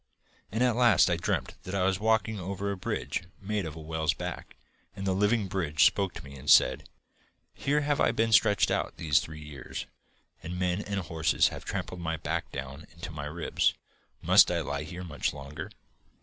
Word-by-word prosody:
'And 115 +4 +1
at 125 -3 +3
last 120 -6 +5
I - - +3
dreamt 85 - -2
that 95 - -6
I 95 - +1
was 95 0 +1
walking 110 0 +1
over 100 +2 -3
a - - -2
bridge 90 -1 -3 0.2
made 100 -2 -2
of 80 - -7
a - - -8
whale's 80 +1 -1
back, 90 -1 -6 0.4
and 95 0 -5
the 95 - +1
living 105 +2 +2
bridge 85 -5 +1
spoke 100 -2 +2
to - - -8
me 70 0 -11
and 65 +3 -6
said: - - +5 0.6
"Here 145 +2 0
have 145 0 +1
I - - +4
been 115 0 +1
stretched 105 -2 +4
out - - -1
these 75 -3 +3
three 75 -1 -8
years, 70 -3 -7 0.6
and 90 +2 -5
men 90 +1 0
and 100 -1 -3
horses 80 -1 +2
have - - -9
trampled 90 - -4
my 80 -1 -2
back 80 - -3
down 70 +3 -7
into 85 +1 -8
my 70 -2 -6
ribs. 80 +3 0 0.5
Must - - +7
I - - 0
lie 70 +1 -3
here 90 +3 -7
much 80 -5 -2
longer?" 70 +1 -7
90 Hz, 195 wpm, -29 LUFS, 80-100 Hz, 0.6 s, Must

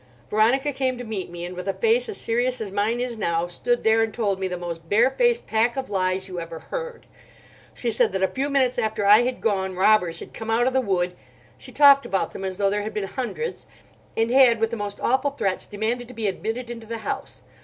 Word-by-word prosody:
Veronica 260 +7 +2
came 260 -1 -1
to 245 - -6
meet 215 -5 -5
me; 175 0 -6
and 180 +1 -7
with 180 +1 -6
a 195 - -1
face 465 +1 +2
as 425 - -4
serious 245 +2 0
as 215 -3 -5
mine 210 +4 0
is 245 -2 -3
now, 170 -3 0
stood 240 +8 -1
there 220 0 +4
and 225 -1 -1
told 200 -5 0
me 190 - -1
the 180 -1 -4
most 170 -2 -7
barefaced 460 - +3
pack 230 +3 +1
of 265 -4 -4
lies 185 0 0
you 180 -2 -5
ever 165 -1 -7
heard. 485 - -7 0.7
She 235 - -2
said - - +2
that 190 0 -1
a - - +4
few 275 +6 -2
minutes 260 -3 +2
after 220 -3 -1
I 210 +3 +8
had 250 +1 -2
gone, 190 -4 0
robbers 180 -3 +3
had - - -10
come 225 0 -7
out 230 +2 +2
of 260 - +1
the 260 - +3
wood—she 130 - -5
talked 280 -1 +6
about 195 - -1
them - - -7
as 190 -1 -3
though 200 -1 +2
there 205 +1 0
had 215 +1 -6
been 210 -2 -1
hundreds—and 250 - -5
had 250 -3 +6
with 225 0 0
the - - -2
most 205 -2 -5
awful 265 +3 +2
threats 195 -9 -2
demanded 225 +4 -2
to 250 - -12
be 225 -1 -3
admitted 225 +5 -3
into 230 -2 -8
the 230 +1 -4
house. - - -5
220 Hz, 230 wpm, -24 LUFS, 190-250 Hz, 0.7 s, I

